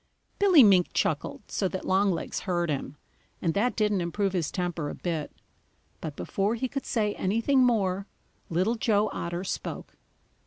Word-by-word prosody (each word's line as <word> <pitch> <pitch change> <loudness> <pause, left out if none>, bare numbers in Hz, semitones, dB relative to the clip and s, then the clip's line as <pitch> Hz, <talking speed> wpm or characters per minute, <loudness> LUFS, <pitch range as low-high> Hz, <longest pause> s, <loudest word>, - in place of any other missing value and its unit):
Billy 375 -8 +7
Mink 190 -4 +5
chuckled - - -1
so 195 - 0
that 185 0 -5
Longlegs 190 -1 +1
heard 175 -4 -1
him, 140 0 -4 0.4
and 165 -2 0
that 235 +5 +1
didn't 210 -3 +1
improve 195 +3 -1
his 170 -5 0
temper 175 -5 -2
a - - -6
bit. 165 -4 -3 0.7
But 155 -3 -6
before 200 +8 -1
he 260 +3 -2
could 275 +2 -5
say 215 -5 0
anything 230 +8 +1
more, 200 -5 +2 0.4
Little 185 +7 +1
Joe 215 -2 +1
Otter 175 +1 -3
spoke. 190 - -5
195 Hz, 155 wpm, -27 LUFS, 175-220 Hz, 0.7 s, Billy